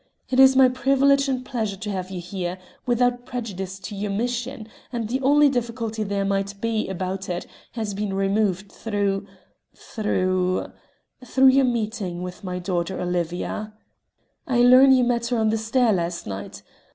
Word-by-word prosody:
It 260 Hz, -, +2 dB
is 265 Hz, 0 st, +8 dB
my 260 Hz, 0 st, +7 dB
privilege 275 Hz, +2 st, +3 dB
and 255 Hz, -1 st, -2 dB
pleasure 220 Hz, -6 st, -3 dB
to 210 Hz, +2 st, -5 dB
have 185 Hz, -1 st, -4 dB
you 190 Hz, -2 st, -5 dB
here 180 Hz, 0 st, -4 dB, 0.3 s
without 245 Hz, 0 st, +1 dB
prejudice 195 Hz, -6 st, -5 dB
to 195 Hz, +3 st, -7 dB
your 205 Hz, +1 st, -3 dB
mission 240 Hz, +2 st, -3 dB, 0.2 s
and 235 Hz, -3 st, -3 dB
the 260 Hz, +4 st, -2 dB
only 290 Hz, +2 st, +5 dB
difficulty 230 Hz, -4 st, -2 dB
there 200 Hz, -1 st, -1 dB
might 200 Hz, 0 st, -2 dB
be 225 Hz, -2 st, -1 dB
about 190 Hz, 0 st, -4 dB
it 175 Hz, 0 st, -3 dB, 0.3 s
has 220 Hz, -4 st, -3 dB
been 200 Hz, -1 st, -3 dB
removed 195 Hz, 0 st, 0 dB
through 205 Hz, -2 st, -2 dB, 0.5 s
through 185 Hz, -4 st, -1 dB, 0.5 s
through 265 Hz, +2 st, +4 dB
your 270 Hz, +1 st, +4 dB
meeting 215 Hz, -7 st, -2 dB
with 180 Hz, +1 st, -8 dB
my 180 Hz, -1 st, -4 dB
daughter 180 Hz, 0 st, -2 dB
Olivia. 180 Hz, +4 st, -3 dB, 0.7 s
I 245 Hz, -3 st, +2 dB
learn 255 Hz, +2 st, +8 dB
you 255 Hz, -1 st, +5 dB
met 240 Hz, -1 st, 0 dB
her 245 Hz, 0 st, 0 dB
on 220 Hz, -1 st, +2 dB
the 220 Hz, -, +1 dB
stair 225 Hz, +1 st, +2 dB
last 170 Hz, -1 st, -2 dB
night. 100 Hz, -1 st, -7 dB
215 Hz, 165 wpm, -23 LUFS, 190-245 Hz, 0.7 s, is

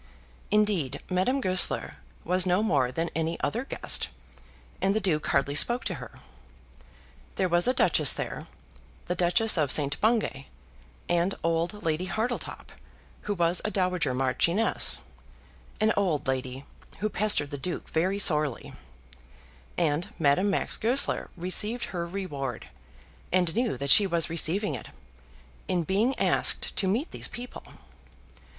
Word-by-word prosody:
Indeed 205 Hz, -10 st, +1 dB
Madame 190 Hz, +10 st, +1 dB
Goesler 185 Hz, -7 st, +2 dB, 0.3 s
was 185 Hz, +2 st, +1 dB
no 180 Hz, +4 st, +2 dB
more 140 Hz, -, +1 dB
than 165 Hz, +5 st, -2 dB
any 165 Hz, +1 st, -1 dB
other 235 Hz, +3 st, -1 dB
guest, -, -, -1 dB, 0.7 s
and 195 Hz, +1 st, +2 dB
the -, -, +2 dB
Duke 175 Hz, -7 st, -1 dB
hardly 140 Hz, +1 st, +1 dB
spoke 240 Hz, -, +3 dB
to -, -, -2 dB
her. -, -, -10 dB, 1.2 s
There 190 Hz, -, +1 dB
was 175 Hz, +2 st, +2 dB
a 255 Hz, -, +3 dB
Duchess -, -, +4 dB
there, -, -, -5 dB, 0.6 s
the 175 Hz, -, -1 dB
Duchess 180 Hz, +3 st, +3 dB
of 145 Hz, -3 st, +1 dB
St. 145 Hz, -1 st, +3 dB
Bungay, 215 Hz, -, 0 dB, 0.6 s
and 175 Hz, +2 st, +1 dB
old 170 Hz, +5 st, -1 dB
Lady 165 Hz, +2 st, -1 dB
Hartletop, 225 Hz, +7 st, -4 dB, 0.6 s
who 205 Hz, -, +1 dB
was 175 Hz, 0 st, +1 dB
a -, -, -1 dB
dowager 180 Hz, -9 st, 0 dB
marchioness, 170 Hz, -, +2 dB, 0.8 s
an 220 Hz, 0 st, +3 dB
old 180 Hz, -9 st, 0 dB
lady 130 Hz, 0 st, -3 dB, 0.3 s
who 215 Hz, -, -1 dB
pestered 205 Hz, -8 st, +2 dB
the 145 Hz, -, -5 dB
Duke 175 Hz, +6 st, -4 dB
very 185 Hz, +5 st, 0 dB
sorely, 150 Hz, -, 0 dB, 1.0 s
and 160 Hz, 0 st, 0 dB
Madame 165 Hz, +5 st, +2 dB
Max 195 Hz, -, -1 dB
Goesler 255 Hz, +5 st, 0 dB
received 210 Hz, +7 st, +1 dB
her 170 Hz, -1 st, -3 dB
reward, 145 Hz, -, -5 dB, 0.6 s
and 180 Hz, -3 st, +2 dB
knew 235 Hz, -1 st, 0 dB
that 140 Hz, -1 st, -1 dB
she 205 Hz, -, +7 dB
was 170 Hz, -2 st, 0 dB
receiving 170 Hz, +3 st, +1 dB
it, 125 Hz, -, -7 dB, 0.8 s
in 175 Hz, -2 st, 0 dB
being 215 Hz, -, +1 dB
asked -, -, +1 dB
to 195 Hz, -, +1 dB
meet 235 Hz, -, -1 dB
these -, -, -3 dB
people. 245 Hz, +1 st, -9 dB
180 Hz, 140 wpm, -27 LUFS, 155-210 Hz, 1.2 s, she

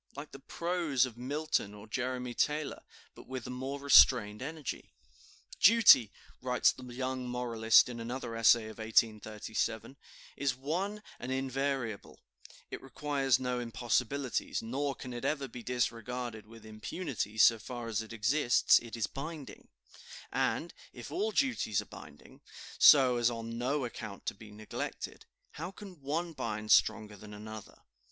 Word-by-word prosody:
like 145 Hz, +2 st, -8 dB
the 135 Hz, -, -10 dB
prose 165 Hz, -3 st, 0 dB
of 125 Hz, -3 st, -9 dB
Milton 130 Hz, -4 st, -2 dB
or 105 Hz, 0 st, -11 dB
Jeremy 125 Hz, +2 st, -3 dB
Taylor, 150 Hz, +3 st, -1 dB, 0.3 s
but -, -, -14 dB
with 130 Hz, -2 st, -6 dB
a -, -, -6 dB
more 135 Hz, +3 st, -5 dB
restrained 125 Hz, -6 st, +6 dB
energy. 150 Hz, +1 st, -6 dB, 0.7 s
"Duty," 210 Hz, -, +7 dB, 0.3 s
writes 125 Hz, -1 st, +3 dB
the -, -, -13 dB
young 130 Hz, +1 st, -4 dB
moralist 115 Hz, -2 st, +4 dB
in 120 Hz, -1 st, -7 dB
another 115 Hz, 0 st, -5 dB
essay 115 Hz, 0 st, +5 dB
of 110 Hz, +1 st, -10 dB
1837, 110 Hz, +2 st, -1 dB, 0.4 s
"is 140 Hz, -3 st, 0 dB
one 185 Hz, +10 st, -3 dB, 0.2 s
and 125 Hz, -, -5 dB
invariable; 135 Hz, -4 st, -3 dB, 0.5 s
it -, -, -6 dB
requires 135 Hz, -1 st, 0 dB
no 125 Hz, -1 st, -2 dB
impossibilities, 120 Hz, +3 st, -1 dB
nor 135 Hz, +4 st, -2 dB
can 125 Hz, -1 st, -8 dB
it 120 Hz, -, -6 dB
ever 140 Hz, -3 st, -1 dB
be 120 Hz, 0 st, -9 dB
disregarded 120 Hz, -1 st, -3 dB
with 115 Hz, 0 st, -14 dB
impunity; 110 Hz, -, -5 dB
so 115 Hz, +1 st, +6 dB
far 120 Hz, +1 st, -7 dB
as 110 Hz, -1 st, -1 dB
it 110 Hz, -, -10 dB
exists, 120 Hz, +4 st, +3 dB
it 115 Hz, -1 st, -9 dB
is 115 Hz, -3 st, 0 dB
binding; 155 Hz, -, -8 dB, 0.6 s
and, -, -, -1 dB, 0.2 s
if -, -, -9 dB
all 410 Hz, +5 st, 0 dB
duties 260 Hz, -, 0 dB
are -, -, -4 dB
binding, -, -, -14 dB, 0.4 s
so 130 Hz, -4 st, +7 dB
as 120 Hz, 0 st, +3 dB
on 115 Hz, -1 st, -5 dB
no 130 Hz, +3 st, -1 dB
account 105 Hz, -4 st, -8 dB
to -, -, -2 dB
be 105 Hz, +2 st, -14 dB
neglected, 105 Hz, 0 st, -6 dB, 0.2 s
how 165 Hz, +4 st, -6 dB
can 190 Hz, -4 st, -12 dB
one 165 Hz, +5 st, -2 dB
bind 110 Hz, -5 st, -4 dB
stronger 110 Hz, -1 st, +3 dB
than 105 Hz, +1 st, -11 dB
another?" 110 Hz, 0 st, -10 dB
125 Hz, 145 wpm, -31 LUFS, 115-140 Hz, 0.7 s, Duty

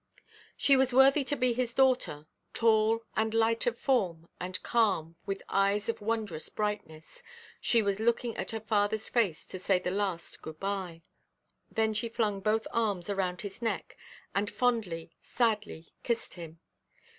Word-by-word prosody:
She 275 Hz, -, +5 dB
was 260 Hz, -1 st, +2 dB
worthy 270 Hz, +2 st, +6 dB
to 290 Hz, -, 0 dB
be 255 Hz, -3 st, +2 dB
his 240 Hz, -1 st, -2 dB
daughter; 255 Hz, -, +2 dB, 0.3 s
tall, 225 Hz, 0 st, +3 dB
and 220 Hz, 0 st, 0 dB
light 225 Hz, +1 st, +2 dB
of 240 Hz, -1 st, +1 dB
form, 180 Hz, -13 st, 0 dB
and 185 Hz, +1 st, -2 dB
calm, 190 Hz, -9 st, +1 dB
with 195 Hz, 0 st, -3 dB
eyes 200 Hz, +2 st, +1 dB
of 230 Hz, -, -2 dB
wondrous 210 Hz, -7 st, -2 dB
brightness, 205 Hz, -7 st, -4 dB, 0.4 s
she 230 Hz, -2 st, +3 dB
was 200 Hz, 0 st, 0 dB
looking 235 Hz, +1 st, +1 dB
at -, -, -4 dB
her 225 Hz, -, -2 dB
fatherʼs 215 Hz, 0 st, 0 dB
face 205 Hz, -10 st, +1 dB
to 185 Hz, -, -7 dB
say 185 Hz, +1 st, +2 dB
the 180 Hz, -, -2 dB
last 190 Hz, -4 st, -2 dB
good–bye. 175 Hz, +1 st, -4 dB, 0.7 s
Then 220 Hz, 0 st, +1 dB
she 215 Hz, +2 st, -2 dB
flung 215 Hz, -3 st, 0 dB
both 215 Hz, +2 st, +1 dB
arms 205 Hz, -5 st, 0 dB
around 185 Hz, -3 st, -1 dB
his 205 Hz, +2 st, -8 dB
neck, 225 Hz, -1 st, -2 dB, 0.4 s
and 205 Hz, +1 st, 0 dB
fondly, 210 Hz, -10 st, -1 dB
sadly, 215 Hz, -8 st, -1 dB
kissed 235 Hz, -1 st, -2 dB
him. 165 Hz, -2 st, -10 dB
210 Hz, 155 wpm, -30 LUFS, 185-230 Hz, 0.7 s, worthy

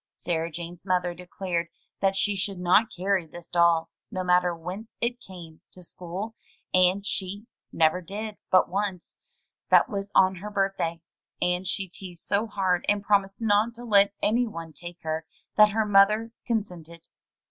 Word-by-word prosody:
Sarah 165 Hz, -1 st, -2 dB
Jane's 170 Hz, +1 st, -7 dB
mother 180 Hz, -2 st, 0 dB
declared 175 Hz, -1 st, -3 dB, 0.3 s
that 195 Hz, -1 st, +2 dB
she 205 Hz, +1 st, +1 dB
should 195 Hz, 0 st, -2 dB
not 180 Hz, +6 st, +4 dB
carry 185 Hz, -1 st, 0 dB
this 175 Hz, +2 st, -9 dB
doll, 170 Hz, -1 st, +3 dB, 0.2 s
no 185 Hz, -4 st, -3 dB
matter 180 Hz, -1 st, +3 dB
whence 185 Hz, +7 st, -8 dB
it 240 Hz, +1 st, -1 dB
came, 175 Hz, -7 st, -12 dB
to 180 Hz, -, -13 dB
school, 185 Hz, +6 st, -6 dB, 0.4 s
and 185 Hz, +2 st, +4 dB
she 200 Hz, +1 st, -4 dB, 0.3 s
never 160 Hz, +2 st, +2 dB
did 205 Hz, +4 st, -6 dB
but 185 Hz, -, +5 dB
once 195 Hz, -2 st, -3 dB, 0.3 s
— -, -, -54 dB
that -, -, +6 dB
was 200 Hz, 0 st, -4 dB
on 190 Hz, 0 st, +5 dB
her 205 Hz, +4 st, -6 dB
birthday, 195 Hz, -5 st, -1 dB, 0.4 s
and 180 Hz, +1 st, 0 dB
she 190 Hz, +1 st, -1 dB
teased 180 Hz, -1 st, -9 dB
so 205 Hz, +3 st, +1 dB
hard, 190 Hz, -4 st, 0 dB
and 205 Hz, -1 st, +2 dB
promised 200 Hz, 0 st, +1 dB
not 220 Hz, +1 st, +2 dB
to 240 Hz, -, -10 dB
let 200 Hz, -3 st, +5 dB
any 235 Hz, +3 st, +2 dB
one 165 Hz, -6 st, -8 dB
take 175 Hz, +1 st, -8 dB
her, 160 Hz, 0 st, -2 dB, 0.3 s
that 210 Hz, 0 st, +7 dB
her 220 Hz, +1 st, 0 dB
mother 210 Hz, +3 st, +4 dB, 0.2 s
con 225 Hz, -3 st, +1 dB
sented. 170 Hz, -3 st, -13 dB
190 Hz, 170 wpm, -26 LUFS, 175-205 Hz, 0.4 s, that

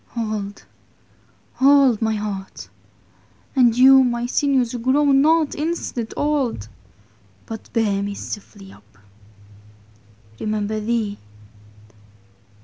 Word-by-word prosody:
Oh 215 Hz, -3 st, -3 dB
fie: 205 Hz, -, -20 dB, 0.9 s
hold 270 Hz, -4 st, +4 dB
my 220 Hz, -1 st, 0 dB
heart; 205 Hz, -2 st, -6 dB, 0.9 s
And 240 Hz, -3 st, +4 dB
you 265 Hz, +1 st, +7 dB
my 240 Hz, -1 st, -1 dB
sinnewes, 255 Hz, -2 st, 0 dB
grow 265 Hz, +5 st, +2 dB
not 305 Hz, +3 st, +3 dB
instant 300 Hz, -7 st, -4 dB
Old; 270 Hz, -, -1 dB, 0.8 s
But 225 Hz, -1 st, -9 dB
beare 205 Hz, -3 st, 0 dB
me 200 Hz, 0 st, -4 dB
stiffely 200 Hz, -1 st, -9 dB
vp: -, -, -17 dB, 1.6 s
Remember 215 Hz, 0 st, -2 dB
thee? 215 Hz, -2 st, -2 dB
235 Hz, 95 wpm, -21 LUFS, 210-270 Hz, 1.6 s, you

